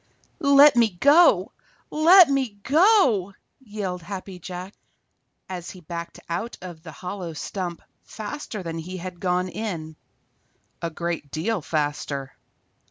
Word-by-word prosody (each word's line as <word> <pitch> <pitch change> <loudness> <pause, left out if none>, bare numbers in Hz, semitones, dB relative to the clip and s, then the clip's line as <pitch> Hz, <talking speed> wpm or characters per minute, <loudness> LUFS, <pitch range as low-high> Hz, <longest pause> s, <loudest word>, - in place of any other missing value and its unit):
_ - - -41 0.4
"Let 280 -2 +7
me 235 -2 +4
go! 305 +5 +5 0.4
Let 340 +3 +7
me 265 -7 -1
go!" 275 - +4 0.2
yelled 205 -7 -5
Happy 185 +1 -7
Jack, 180 +2 -7 0.7
as 180 -1 -6
he 185 - -11
backed 170 0 -7
out 180 +8 -4
of 175 -3 -9
the 160 -1 -10
hollow 180 +2 -6
stump 175 +2 -5 0.2
faster 220 -2 -7
than 165 -1 -5
he 180 +3 -6
had 180 0 -7
gone 180 0 0
in, 170 -7 -5 0.9
a 170 - -2
great 170 -2 -4
deal 180 +8 -2
faster. 145 -3 -3
185 Hz, 130 wpm, -24 LUFS, 170-230 Hz, 0.9 s, Let